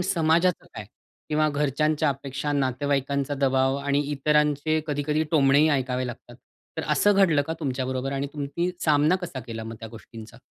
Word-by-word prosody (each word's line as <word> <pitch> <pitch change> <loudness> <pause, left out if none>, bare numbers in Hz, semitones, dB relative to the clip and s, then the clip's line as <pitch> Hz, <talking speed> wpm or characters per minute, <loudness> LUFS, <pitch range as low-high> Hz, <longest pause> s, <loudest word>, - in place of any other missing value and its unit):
समाजाचं 170 0 +1
काय 105 - -7 0.4
किंवा 155 0 +2
घरच्यांच्या 150 +2 0
अपेक्षा, 140 +1 -3
नातेवाईकांचा 140 +1 -1
दबाव 135 -1 +1
आणि 140 0 0
इतरांचे 150 +2 +1
कधी-कधी 150 +1 -1
टोमणेही 145 0 +4
ऐकावे 130 -3 0
लागतात. 120 - -10 0.4
तर - - -2
असं 205 - +4
घडलं 170 -7 +4
का 160 - -2
तुमच्याबरोबर 130 -1 -2
आणि 140 +1 -2
तुम्ही 150 +4 -2
सामना 155 +3 +3
कसा 175 -8 -6
केला 115 -2 -7
मग 115 0 -7
त्या 115 - -7
गोष्टींचा? 115 0 -12
145 Hz, 150 wpm, -25 LUFS, 130-155 Hz, 0.4 s, टोमणेही